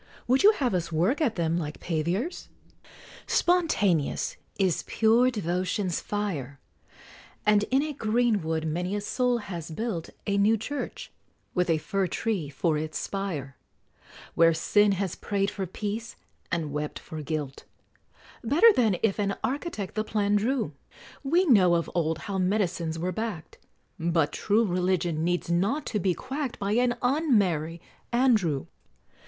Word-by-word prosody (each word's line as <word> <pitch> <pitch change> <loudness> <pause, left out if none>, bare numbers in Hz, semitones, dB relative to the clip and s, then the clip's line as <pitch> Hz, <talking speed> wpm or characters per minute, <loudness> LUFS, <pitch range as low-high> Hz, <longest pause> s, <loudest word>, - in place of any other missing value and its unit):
Would 260 +2 +4
you 420 +2 +7
have 260 - 0
us 170 -2 -1
work 185 - +1
at 250 -8 +1
them 170 -1 0
like 150 -2 -5
paviors? 175 - -2 0.8
Spontaneous 260 - +1 0.2
is 190 -4 +1
pure 230 +3 +4
devotion's 185 -3 -1
fire; 155 -11 -4 0.9
And 210 0 +4
in 270 +2 +2
a 305 -1 -3
green 230 -3 +1
wood 160 0 -2
many 175 +5 -2
a 205 - -2
soul 250 +3 +1
has 175 -7 -6
built 175 -1 -3 0.2
A 200 -1 +1
new 215 +3 +4
Church, 280 +7 -5 0.4
with 180 -1 +1
a 165 - +3
fir 195 +4 -1
tree 185 -4 -2
for 150 +2 0
its 155 0 -4
spire, 165 -10 -4 0.8
Where 165 -1 +5
Sin 205 +5 +3
has 190 -2 -2
prayed 200 0 -1
for 195 -2 -4
peace, 215 +5 -5 0.4
and 165 -4 -1
wept 150 +1 -3
for 155 -1 -8
guilt, 150 -2 -4 0.8
Better 330 - +6
than 220 - +2
if 220 -2 +1
an 200 -1 0
architect 265 - -3
the 215 - -1
plan 210 -1 0
drew; 225 - 0 0.5
We 340 +7 +3
know 190 - +5
of 170 - -1
old 160 -2 0
how 195 -1 -2
medicines 180 -4 0
were 180 +3 -2
back'd, 210 -4 -5 0.4
But 165 -2 +1
true 220 +2 +2
Religion 180 -3 0
needs 175 0 0
not 205 - +1
to 210 - +1
be 185 -2 +1
quack'd 265 - -4
By 200 -1 -2
an 240 +2 +2
Un 275 0 +3
merry 165 -4 0 0.3
Andrew! 220 - +2
195 Hz, 150 wpm, -27 LUFS, 165-225 Hz, 0.9 s, you